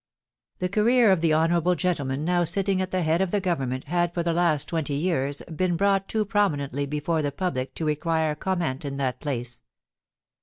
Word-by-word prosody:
The 180 - -1
career 220 +3 +4
of 185 -4 +2
the 165 -2 +2
honourable 170 +3 +2
gentleman 150 -5 -1
now 175 0 +2
sitting 190 +2 0
at 185 - -2
the 185 -1 -1
head 160 +3 +2
of 190 - +1
the 205 - +1
Government 135 -9 -2
had 175 +2 -1
for 170 - 0
the 170 0 0
last 160 -4 +2
twenty 155 -4 -2
years 145 -3 -1
been 180 +1 +1
brought 195 +1 +2
too 215 -1 0
prominently 145 -9 0
before 150 +3 -1
the 145 -1 -1
public 140 -5 -3
to 160 - -3
require 155 +1 0
comment 165 -5 -2
in 140 -1 -4
that 130 -2 -2
place. 120 -4 -4
165 Hz, 190 wpm, -25 LUFS, 145-185 Hz, -, career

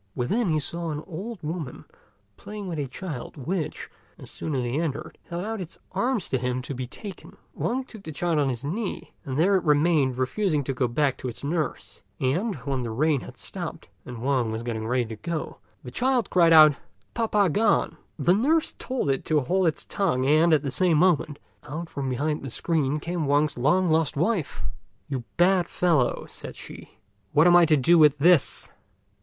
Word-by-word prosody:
Within 200 - 0
he 155 -1 +2
saw 165 +4 -3
an 150 0 -4
old 195 +3 -7
woman 155 -4 -5 0.5
playing 210 -1 -8
with 165 -4 -4
a 140 - -2
child, 150 0 -7
which, 160 +4 -3 0.3
as - - -11
soon 155 - -4
as 125 -2 -1
he 120 +5 -1
entered, 155 -1 -4
held 175 +2 -4
out 220 -2 -3
its 175 -1 -8
arms 245 -6 0
to 130 - 0
him 125 +1 -2
to 140 - -5
be 125 -1 -5
taken. 195 - -10 0.2
Wang 260 +3 -1
took 220 -5 -12
the 160 - -7
child 165 +1 0
on 140 -2 +2
his 125 +1 -4
knee, 195 +7 -4
and 130 -1 -3
there 190 +6 +4
it 185 - -2
remained, 150 -4 +3
refusing 150 +4 0
to 135 - -2
go 125 -1 0
back 135 +3 0
to - - -4
its 120 - -7
nurse; 155 +2 -3 0.2
and, 180 - 0
when 135 -2 -1
the 120 - -3
rain 145 +4 +1
had - - -11
stopped, - - -7
and 120 -1 -8
Wang 130 -4 +1
was 110 +1 -4
getting 110 -2 -3
ready 125 0 +1
to 110 0 -7
go, 165 0 -5 0.2
the 125 - -8
child 250 - +1
cried 170 -2 +5
out, 155 -2 +9 0.4
"Pa 230 -1 0
pa 205 -2 +3
gone!" 205 +5 +2 0.2
The 165 +3 +3
nurse 300 - +2
told 255 - -2
it 135 - -1
to 155 -1 +2
hold 180 +6 +1
its 160 - -1
tongue, 160 -10 0
and, 155 +4 +4
at 155 -2 +4
the 140 - -2
same 175 +1 +2
moment, 155 -4 +2 0.3
out 160 +3 -6
from 135 -2 -3
behind 150 +4 -1
the 135 - -6
screen 150 +2 0
came 170 -1 -3
Wang's 145 +1 +2
long 155 +9 +2
lost 160 -3 +1
wife. 175 0 -1 0.4
"You 130 -5 -4
bad 180 0 +4
fellow," 160 -9 +1
said - - -8
she, - - -11 0.4
"what 150 +2 +5
am 175 0 +7
I 175 -1 +7
to 155 -1 +4
do 165 +6 +5
with 150 -2 +6
this?" 165 +1 +3
155 Hz, 200 wpm, -25 LUFS, 135-180 Hz, 0.5 s, out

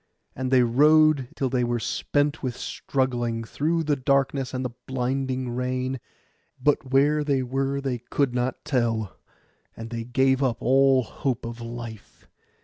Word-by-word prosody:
And 130 0 -2
they 130 -1 +5
rowed 150 +2 +4
till 135 - 0
they 125 -2 +1
were 120 0 0
spent 145 +6 -1
with 125 -2 -3
struggling, 120 -5 -2
through 160 +8 -1
the 150 -1 +1
darkness 135 0 +1
and 130 0 -3
the 125 - -3 0.2
blinding 130 0 -2
rain; 130 +1 -2 0.6
but 135 0 +1
where 145 +3 +3
they 140 -3 +1
were 135 +2 -1
they 135 -3 -2
could 125 +2 -1
not 125 +3 -2
tell, 115 -7 0 0.6
and 115 +1 -7
they 115 -1 -3
gave 130 +2 +2
up 125 -4 +1
all 135 +1 +4
hope 120 +1 -3
of 115 0 -7
life. 115 -2 -9
130 Hz, 150 wpm, -25 LUFS, 120-135 Hz, 0.6 s, they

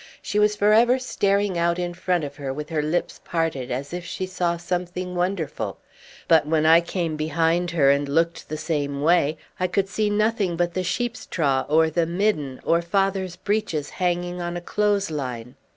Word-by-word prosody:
She 210 - -1
was 210 0 +3
for 210 +1 +3
ever 240 +3 +5
staring 200 -6 0
out 170 0 +2
in 175 -1 -2
front 175 -1 0
of 145 0 -6
her 140 -2 -4
with 150 +2 -6
her 160 -2 0
lips 155 +4 -2
parted, 165 -7 -2
as 135 +5 -4
if 180 0 -4
she 185 +2 -4
saw 180 -2 -1
something 180 +1 -3
wonderful; 180 -2 -2 0.5
but 160 -2 +4
when 155 0 +2
I 165 +1 +7
came 170 -2 -2
behind 165 +3 +1
her 145 -5 +4
and 140 0 0
looked 165 +3 0
the 155 - -3
same 145 -3 -2
way, 160 -2 +3 0.2
I 185 - +1
could 195 +1 0
see 210 +1 0
nothing 210 -3 +1
but 175 0 0
the 185 - -1
sheep's 240 +6 -2
trough 140 -5 0
or 160 +1 +4
the 165 +1 +1
midden, 170 -7 0
or 170 +1 +2
father's 190 0 0
breeches 185 -6 -2
hanging 175 0 -1
on 175 0 -3
a - - -3
clothes 205 0 0
line. 125 -5 -5
175 Hz, 190 wpm, -24 LUFS, 155-185 Hz, 0.5 s, I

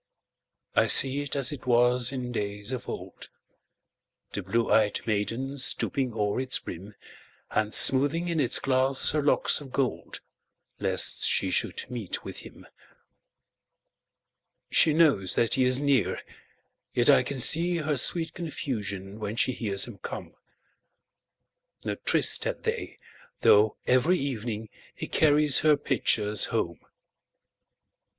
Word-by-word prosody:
I - - +3
see 135 +2 +5
it 145 -1 -5
as 140 0 +1
it 135 -3 -9
was 120 0 +2
in 125 -2 -6
days 105 0 -5
of 130 - -6
old, - - -9 1.0
The 100 - -4
blue 115 +5 -1
ey'd 105 -2 +1
maiden 115 +6 -3
stooping 130 0 -1
o'er 105 +1 -2
its 130 0 +1
brim, 100 +5 -10 0.6
And 110 0 -1
smoothing 145 +9 +6
in 170 -2 -2
its 130 -5 +2
glass 130 0 +1
her 150 - -1
locks 145 +1 +2
of 135 -3 -12
gold, 135 -3 -3 0.6
Lest - - +2
she - - 0
should - - -1
meet 115 -7 -6
with - - -8
him. - - -13 2.1
She 160 - +4
knows 150 - +2
that 115 - 0
he 130 - +2
is 125 +1 +2
near, 140 -5 0 0.8
yet 120 - +1
I 135 -3 +5
can 135 +2 -5
seeHer 155 +1 +3
sweet 165 +6 -1
confusion 105 - -6
when 105 0 -5
she 130 - 0
hears 100 -5 -1
him 115 -5 -12
come.No - - -13
tryst - - +2
had - - -4
they, - - -4 0.4
though 105 +1 +3
every 130 +9 +2
evening 115 -6 -5 0.3
heCarries 150 -2 +2
her 150 -1 +3
pitchers 105 -6 0
home. 85 -8 -3
125 Hz, 130 wpm, -26 LUFS, 110-140 Hz, 2.1 s, smoothing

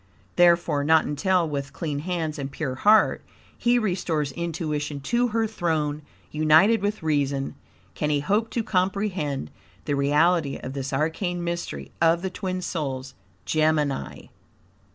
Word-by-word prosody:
Therefore, 170 -4 +4
not 160 +1 +4
until, 175 +4 +1
with 140 -2 -4
clean 150 -4 -3
hands 160 -2 -3
and 135 -1 -3
pure 135 -3 -3
heart, 210 +11 +4 0.3
he 245 0 +2
restores 175 - -1
intuition 150 -2 -3
to 240 - +1
her 225 -1 0
throne, 160 -8 -1 0.3
united 160 +9 +4
with 205 -2 -2
reason, 140 -3 0 0.4
can 150 - -2
he 145 -1 +2
hope 205 +9 0
to 230 - -2
COMPREHEND 185 - -1 0.3
the 145 - -1
reality 150 +2 +2
of 130 - -7
this 135 -1 -4
arcane 165 +5 -1
mystery 170 - -4
of 170 +1 +3
the 190 - -2
twin 185 -1 -4
souls, 135 -6 -4 0.3
Gemini. 155 -3 0
160 Hz, 135 wpm, -25 LUFS, 145-185 Hz, 0.4 s, Therefore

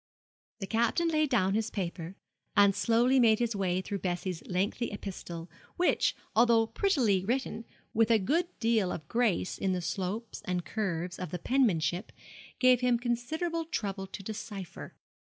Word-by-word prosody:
The - - -2
Captain 235 - +1
laid 310 -2 +2
down 195 -7 +2
his 220 +1 0
paper, 180 -2 -4 0.4
and 200 -1 +6
slowly 245 +3 +3
made 225 -3 +5
his 235 -1 -1
way 185 -2 0
through 200 +1 -4
Bessie's 180 -1 -3
lengthy 195 +6 -1
epistle, 175 -4 -7 0.3
which, 360 - +2 0.2
although 230 -1 +5
prettily 230 - +1
written, 235 0 -2 0.3
with 225 0 +3
a 230 - +6
good 310 - +1
deal 225 -5 +2
of 155 - -6
grace 230 -6 0
in 190 -1 +1
the 180 - -1
slopes 195 +6 -4
and 180 -2 -2
curves 180 -3 -3
of 180 - -4
the 180 - -3
penmanship, 180 -5 +1 0.5
gave 255 -1 +5
him 250 -1 +3
considerable 315 +8 -2
trouble 200 - -3
to 195 - -8
decipher. 205 -3 -7
215 Hz, 155 wpm, -30 LUFS, 185-240 Hz, 0.5 s, and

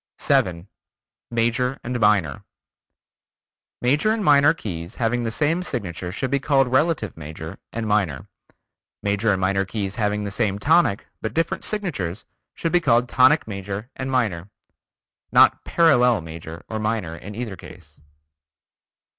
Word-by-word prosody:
7. 90 0 +1 0.6
Major; 120 +3 0
Minor: 105 - +1 1.4
Major 145 +11 +2
and 220 -3 -1
Minor 145 -1 +6
keys 85 - -6
having 120 +1 0
the 115 - -1
same 155 +9 0
signature 95 - -4
should 130 +7 -3
be 140 - +2
called 135 -2 +2
relative 135 - +1
major 80 +3 -8
and 115 -1 -4
minor. 100 -10 0 0.8
Major 105 +2 +1
and 95 - 0
minor 95 +1 +1
keys 100 0 -4
having 105 -1 0
the 100 - -4
same 100 0 0
tonic, 150 -4 +2 0.2
but 110 - -4
different 165 +1 -1
signatures, 130 - -2 0.3
should 165 - -2
be 175 - +3
called 120 -6 +3
tonic 130 +4 +4
major 100 +3 -6
and 130 0 -4
minor. 105 -9 -1 0.8
Not - - +5
"parallel" 125 - +4
major 80 0 -9
or 110 - -4
minor 105 -6 -2
in 100 +4 -9
either 115 -4 -5
case. 80 -3 -14
110 Hz, 140 wpm, -23 LUFS, 95-130 Hz, 1.4 s, Minor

